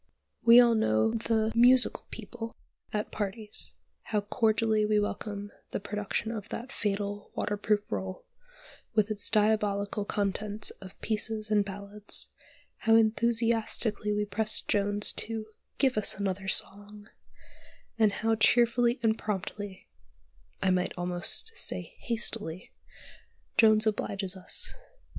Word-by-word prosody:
We 235 +1 +8
all 240 -1 +6
know 165 - +2
the 225 -1 0
"musical 245 +2 +5
people" 230 -2 -7 0.3
at 210 0 -3
parties; 210 - -3 0.3
how 210 - 0
cordially 215 +1 +1
we 210 0 +2
welcome 205 0 -4 0.2
the - - -3
production 210 +2 -3
of 215 -2 -6
that 255 +3 -6
fatal 205 -3 -3
waterproof 205 0 0
roll, 190 -1 -4 0.7
with 215 0 +2
its 205 -1 +1
diabolical 210 -1 +1
contents 205 +1 -1
of 185 -1 -12
"pieces" 215 0 -2
and 210 -1 +4
"ballads;" 200 +1 -4 0.5
how 225 0 +3
enthusiastically 225 -1 +1
we 210 0 0
press 215 +2 +1
Jones 205 0 0
to 225 -1 -3 0.3
"give 265 -2 +2
us 210 - 0
another 195 -1 -3
song," 205 +2 0 0.9
and 215 -2 +5
how 225 +2 0
cheerfully 235 +2 +3
and 220 0 +2
promptly 205 -1 -5 0.8
(I 190 - +3
might 180 0 0
almost 175 - +1
say - - -2
"hastily") 220 -7 -1 0.8
Jones 215 0 +5
obliges 200 -3 -1
us. 185 -1 -1
210 Hz, 120 wpm, -29 LUFS, 200-225 Hz, 0.9 s, We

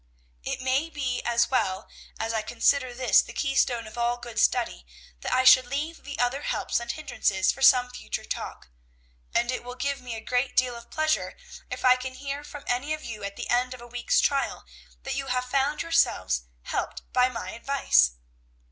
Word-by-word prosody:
"It - - -4
may 265 +5 +1
be 265 -5 -2
as 235 0 +2
well, 190 -3 0 0.3
as 225 +1 -2
I 220 - 0
consider 245 +4 +1
this 245 -4 +4
the - - -10
keystone 260 -4 +1
of 220 +2 -9
all 240 +1 +1
good 240 -1 -6
study, - - +1 0.4
that - - -4
I 255 - +3
should 255 -1 +8
leave 300 +5 -4
the 285 0 -6
other 245 +3 0
helps - - -1
and 235 0 -3
hindrances 240 -10 0
for 270 - -10
some 250 -2 +6
future - - -5
talk; - - -6 0.7
and 240 +1 +2
it 255 - -4
will 245 0 -7
give 280 +1 -2
me 245 -2 -6
a - - -5
great 250 +3 -1
deal 255 -1 +3
of 235 0 -11
pleasure 310 0 0 0.3
if - - -4
I 255 0 +7
can 255 0 -6
hear 280 +1 -5
from 290 -1 -9
any 275 +5 0
of 310 - -13
you 215 -3 -7
at 200 0 -5
the - - -5
end 250 +1 +1
of 250 - -13
a - - -10
week's 240 0 +1
trial, 275 -1 0 0.4
that - - -3
you 275 - -3
have 250 0 0
found 275 +3 0
yourselves 95 - +1 0.2
helped - - -3
by 250 0 +4
my 230 -2 -5
advice." 230 - +3
250 Hz, 200 wpm, -26 LUFS, 235-275 Hz, 0.7 s, should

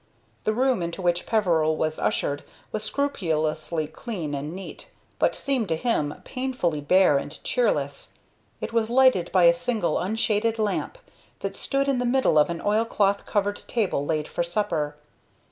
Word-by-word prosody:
The 215 - +2
room 255 -4 +2
into 170 +2 -4
which 175 -1 0
Peveril 165 -8 +2
was 155 0 -1
ushered 145 0 0 0.3
was 215 - -2
scrupulously 160 - -1
clean 160 -1 -5
and 145 +2 -3
neat, 190 - -8 0.3
but - - +2
seemed 260 -6 0
to 160 - +2
him 160 -6 0
painfully 250 - -2
bare 165 -1 +4
and 145 - -7
cheerless. 145 - -1 0.5
It - - -4
was 230 -1 +1
lighted 250 -8 +4
by 185 -1 +4
a 170 0 +8
single, 175 -2 0
unshaded 220 +2 +1
lamp, 215 - -1 0.4
that - - -3
stood 275 0 0
in 270 -3 +1
the 250 - 0
middle 255 -11 +3
of 150 - +4
an 170 -1 -4
oilcloth 205 -2 +1
covered 205 0 0
table 205 -11 0
laid 155 0 -1
for - - -3
supper. 170 -4 -1
190 Hz, 160 wpm, -25 LUFS, 155-230 Hz, 0.5 s, a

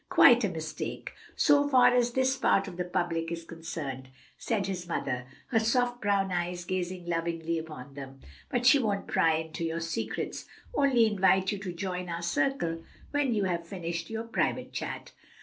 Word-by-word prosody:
"Quite 245 -2 +7
a 205 - +2
mistake, 160 -3 -5 0.2
so 290 0 +4
far 250 -2 +6
as 245 -1 +2
this 260 +1 +2
part 200 -7 +2
of 185 - -7
the 180 - 0
public 175 -2 -1
is 165 0 -4
concerned," 155 -6 -6 0.3
said 215 -4 -1
his 180 -2 -4
mother, 125 -6 -2 0.2
her 225 - +3
soft 245 +2 +1
brown 200 -2 +1
eyes 175 0 -2
gazing 180 -1 -3
lovingly 165 -1 -1
upon 150 -4 -9
them, 135 -1 -9 0.3
"but 245 0 +1
we 285 - +4
won't 205 -5 -1
pry 165 -1 +3
into 160 +1 -4
your 165 0 -1
secrets, 165 0 -3 0.3
only 265 - +4
invite 190 -2 +3
you 205 - -3
to 190 -2 -5
join 180 0 -4
our 170 0 -4
circle 170 -3 0 0.3
when 285 -5 +1
you 205 - +1
have 170 -2 -1
finished 170 -2 -4
your 225 0 -3
private 230 0 -1
chat." - - -5
180 Hz, 175 wpm, -29 LUFS, 165-225 Hz, 0.3 s, Quite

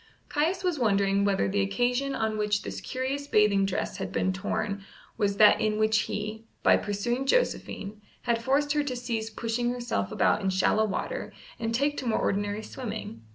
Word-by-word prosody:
Caius 330 +6 0
was 355 -5 0
wondering 200 -3 +2
whether 195 -1 +2
the 200 +1 +1
occasion 245 +7 0
on 220 -1 -1
which 210 -1 0
this - - -5
curious 270 +2 -3
bathing 205 -4 +4
dress 190 0 -2
had 195 - -4
been 190 - 0
torn 200 +1 -2 0.3
was 200 -3 0
that 210 0 +7
in 215 -1 +1
which 215 0 +2
he, 215 +2 -4 0.2
by - - +6
pursuing 240 +6 -1
Josephine, 215 - 0 0.2
had 230 -1 +1
forced 280 +4 +1
her 295 -1 +2
to 265 -3 -3
cease 230 -3 -3
pushing 230 +2 -1
herself 240 - -2
about - - +2
in 195 - 0
shallow 190 +3 +2
water - - -3 0.3
and 225 0 -1
take 285 +3 +1
to 255 - -4
more 225 - +2
ordinary 205 +1 -1
swimming. 215 - -6
220 Hz, 180 wpm, -28 LUFS, 200-250 Hz, 0.3 s, that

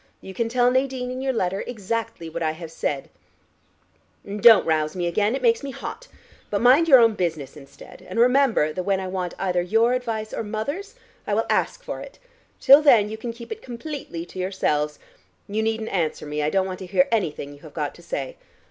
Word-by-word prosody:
You 190 - -10
can 230 +3 -1
tell 245 +1 +3
Nadine 260 -1 -1
in 255 +1 -5
your 265 0 0
letter 195 -5 -1
exactly 230 -4 -4
what 165 +1 -6
I 155 -1 0
have 160 0 -9
said. 145 -4 -3 1.1
And 200 +1 -6
don't 225 -2 +8
rouse 155 0 0
me 175 -1 -2
again: 205 +7 +1
it 270 - -5
makes 230 -1 +3
me 280 - -5
hot. - - -7 0.4
But 200 - 0
mind 265 +7 +5
your 275 -5 +9
own 230 -2 +5
business 165 -8 -3
instead, 140 -1 -14
and - - -3
remember 245 - +3
that 185 - -3
when 195 +1 0
I 190 - -4
want 185 -2 -4
either 180 -2 0
your 225 +7 +2
advice 225 -4 -3
or - - -2
mother's 285 - -4 0.3
I - - +1
will - - +1
ask - - 0
for - - -5
it. - - -11 0.4
Till 275 +3 +8
then 230 -8 +5
you 220 - -6
can 235 +1 -4
keep 235 - -12
it 445 0 -5
completely 245 - -7
to 180 - -10
yourselves. 150 -6 -1 0.5
You 210 +2 -1
needn't 220 0 -1
answer 165 -5 -2
me: 150 0 -3
I 150 - +1
don't 190 +2 +1
want 185 -1 -5
to 185 - -8
hear 180 0 +3
anything 155 -9 -1
you 145 - -15
have 155 -1 -14
got 150 -2 -2
to - - -16
say. 135 -5 -5
210 Hz, 215 wpm, -23 LUFS, 170-245 Hz, 1.1 s, your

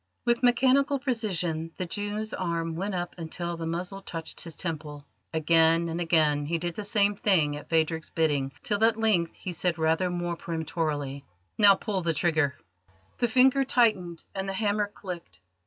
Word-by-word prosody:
With 240 0 +2
mechanical 265 +3 +4
precision 180 - -1
the 185 - -2
Jew's 205 +4 -4
arm 165 -2 -2
went 195 +3 -2
up 175 -1 -3
until 170 +1 -3
the 165 -1 -5
muzzle 180 +4 -3
touched 165 -4 -6
his 165 -3 -6
temple. 150 -4 -5 0.3
Again 165 +1 +3
and 165 +2 -3
again 155 -3 +2
he 170 +2 0
did 175 +1 -3
the 210 - -5
same 205 0 +2
thing 165 -8 +2
at 145 - -9
Phadrig's 160 0 0
bidding, 145 -4 0
till 210 0 0
at 225 0 +4
length 210 -7 +1
he 185 - -6
said 175 0 -1
rather 160 +3 +1
more 175 -1 -2
peremptorily: 155 -4 -3 0.4
"Now 200 -2 +8
pull 200 -2 -2
the 165 -1 0
trigger!" 155 -4 +1 0.6
The 240 - +3
finger 260 +3 +4
tightened 215 -10 +1
and 195 0 -3
the - - -2
hammer 205 +1 0
clicked. 170 - -8
175 Hz, 170 wpm, -27 LUFS, 160-205 Hz, 0.6 s, Now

